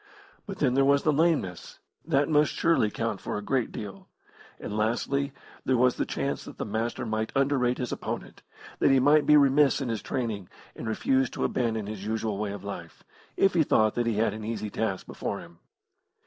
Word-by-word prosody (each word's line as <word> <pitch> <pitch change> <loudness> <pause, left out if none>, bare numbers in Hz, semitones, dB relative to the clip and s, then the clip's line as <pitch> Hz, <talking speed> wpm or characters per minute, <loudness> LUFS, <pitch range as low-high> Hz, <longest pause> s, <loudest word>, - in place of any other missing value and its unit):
But 195 - -6
then 130 -4 +2
there 135 +1 +4
was 140 +1 +4
the 155 - +3
lameness; 145 - 0 0.3
that 145 -3 +2
must 150 -1 +3
surely 165 -10 +2
count 110 -2 -3
for - - -3
a 105 - -5
great 130 +1 0
deal. 100 -2 -8 0.5
And, 105 - -5
lastly, 130 +6 0 0.3
there 130 - +2
was 125 +1 +3
the - - -1
chance - - -2
that - - -10
the - - -3
Master 110 +3 -2
might 110 0 -2
underrate 135 -3 +2
his 125 -2 -3
opponent, - - -5 0.4
that - - +4
he 135 -1 +5
might 145 +3 +4
be 150 - +7
remiss 140 0 +4
in 135 -4 -3
his 115 -2 -2
training, 110 -7 -3 0.3
and - - -6
refuse 130 +3 +1
to - - -4
abandon 115 -4 0
his 105 -1 -6
usual 110 -1 -2
way 105 -1 -2
of 100 -2 -7
life, 90 -5 -8 0.3
if 195 - +4
he 170 - +4
thought 110 -7 +3
that 120 -1 -1
he 115 - +1
had 110 +2 +1
an 110 0 -7
easy 110 -1 -4
task 95 -4 -2
before - - -4
him. 85 -1 -14
120 Hz, 205 wpm, -27 LUFS, 105-140 Hz, 0.5 s, be